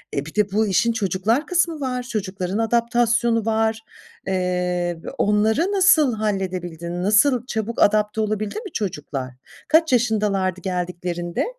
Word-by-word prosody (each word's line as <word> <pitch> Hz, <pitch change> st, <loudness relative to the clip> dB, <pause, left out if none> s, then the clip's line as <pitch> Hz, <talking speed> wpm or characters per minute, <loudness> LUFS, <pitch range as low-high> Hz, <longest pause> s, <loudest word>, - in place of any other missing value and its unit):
E, 140 Hz, -, -2 dB
bir 155 Hz, -, -11 dB
de 210 Hz, -2 st, +1 dB
bu 215 Hz, +2 st, +1 dB
işin 215 Hz, +5 st, +2 dB
çocuklar 220 Hz, -, 0 dB
kısmı 345 Hz, -3 st, +1 dB
var. 250 Hz, -2 st, -2 dB
Çocukların 195 Hz, -4 st, -3 dB
adaptasyonu 235 Hz, 0 st, +1 dB
var. 220 Hz, 0 st, +1 dB, 0.5 s
Eee, 180 Hz, -2 st, -1 dB
b -, -, -5 dB
onları 215 Hz, +6 st, +2 dB
nasıl 315 Hz, -, +4 dB
halledebildin? 180 Hz, -5 st, -3 dB
Nasıl, 230 Hz, +5 st, +3 dB
çabuk 220 Hz, 0 st, -3 dB
adapte 210 Hz, +1 st, +3 dB
olabildi 215 Hz, -1 st, -2 dB
mi 395 Hz, -, -7 dB
çocuklar? 145 Hz, -, -4 dB, 0.3 s
Kaç 320 Hz, -1 st, +3 dB
yaşındalardı 205 Hz, -6 st, +1 dB
geldiklerinde? 175 Hz, -1 st, -3 dB
210 Hz, 130 wpm, -22 LUFS, 180-235 Hz, 0.5 s, nasıl